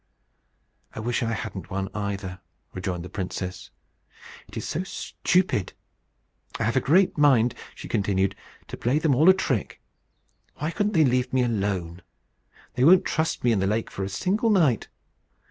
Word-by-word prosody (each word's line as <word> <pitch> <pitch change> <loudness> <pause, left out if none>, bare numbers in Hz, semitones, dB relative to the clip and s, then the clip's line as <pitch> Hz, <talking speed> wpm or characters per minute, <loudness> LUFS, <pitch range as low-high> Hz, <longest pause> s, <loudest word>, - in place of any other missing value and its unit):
"I - - -5
wish 120 +2 -1
I 115 -1 -1
hadn't 95 -3 -6
one 95 0 -2
either," 100 -3 -4 0.3
rejoined 90 -2 -4
the - - -6
princess; 90 -1 -5 0.8
"it - - -10
is - - -4
so 165 - -2
stupid! 180 - 0 0.9
I - - 0
have 115 +2 0
a - - +5
great 175 +4 +3
mind," 125 -5 +4 0.2
she - - -9
continued, 95 -1 0 0.3
"to - - -6
play 125 +5 +1
them 155 -2 +2
all 155 +8 +5
a - - +9
trick. 130 - -2 0.8
Why 155 +3 -3
couldn't 205 +5 -1
they 160 -3 +5
leave 125 -1 +1
me 130 -1 +2
alone? 95 -6 -2 0.7
They 125 +1 0
won't 180 +5 +6
trust 160 0 -1
me 120 - +3
in 110 - +2
the 95 - +1
lake 110 +2 -1
for 100 - -4
a 95 - -3
single 195 - 0
night! 160 - +3
115 Hz, 165 wpm, -25 LUFS, 95-155 Hz, 0.9 s, a